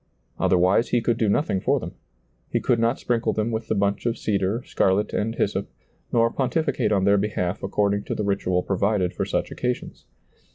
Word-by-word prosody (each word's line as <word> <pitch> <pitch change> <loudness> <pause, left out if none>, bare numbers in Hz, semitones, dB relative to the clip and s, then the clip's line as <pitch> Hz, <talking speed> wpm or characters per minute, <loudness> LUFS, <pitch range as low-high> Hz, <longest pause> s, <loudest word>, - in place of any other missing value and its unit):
Other 90 - +3
wise 95 +6 +3
he 120 - +2
could 115 0 0
do 110 -4 +2
nothing 100 -3 +1
for - - +2
them; - - -6 0.6
he - - 0
could 120 - +1
not 115 +3 +2
sprinkle 120 -1 0
them 110 +2 -1
with 110 0 -3
the - - 0
bunch 100 +3 0
of 115 - -1
cedar, 100 +3 -1
scarlet 95 +2 +1
and 115 +2 -1
hyssop, 100 -2 -1 0.4
nor 115 -1 +3
pontificate 135 +3 0
on 100 -2 +2
their 100 +1 +4
behalf 100 -2 -2
according 100 +1 0
to - - -3
the 105 - -2
ritual 90 -3 0
provided 100 -1 0
for - - -2
such - - -2
occasions. 125 0 -4
105 Hz, 195 wpm, -24 LUFS, 100-115 Hz, 0.6 s, their